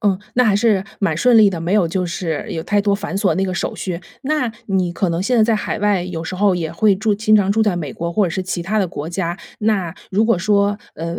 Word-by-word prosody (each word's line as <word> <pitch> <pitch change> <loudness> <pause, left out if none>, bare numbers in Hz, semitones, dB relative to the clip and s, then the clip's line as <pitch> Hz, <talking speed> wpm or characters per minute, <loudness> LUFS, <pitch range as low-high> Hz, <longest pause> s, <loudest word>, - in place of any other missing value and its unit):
嗯， 200 -4 +1 0.2
那 250 - +4
还 210 -3 +3
是 205 -3 +2 0.2
蛮 180 -6 +1
顺 240 +5 +5
利 210 -2 +7
的， 185 - -3
没 170 +3 -2
有 200 -5 +3
就 185 +2 -1
是 170 -2 -3
有 165 -4 -3
太 205 +3 +1
多 200 -1 +2
繁 200 -1 -4
琐 200 -1 +2
那 190 - 0
个 185 -1 -2
手 - - -2
续。 180 -3 -4 0.2
那 275 -4 -1
你 185 -3 0
可 190 +1 -1
能 170 +2 -1
现 250 +5 0
在 220 - +6
在 220 0 +3
海 210 - -3
外 205 -3 +1
有 175 -2 -5
时 185 +2 -5
候 200 -1 +3
也 165 -3 -3
会 205 +4 +3
住 210 +2 0
经 215 +1 +2
常 200 -2 +4
住 220 +2 +2
在 205 -4 +1
美 150 -6 -4
国 170 +1 -4
或 210 +1 +2
者 170 - -3
是 190 +2 -2
其 185 -1 -3
他 215 +5 -1
的 190 - +2
国 155 -2 -6
家， 175 +1 -3 0.2
那 200 -6 0 0.2
如 210 +4 +2
果 225 -5 +2
说， 205 +1 +1 0.2
呃 170 +2 -5
195 Hz, 295 characters per minute, -19 LUFS, 175-210 Hz, 0.2 s, 利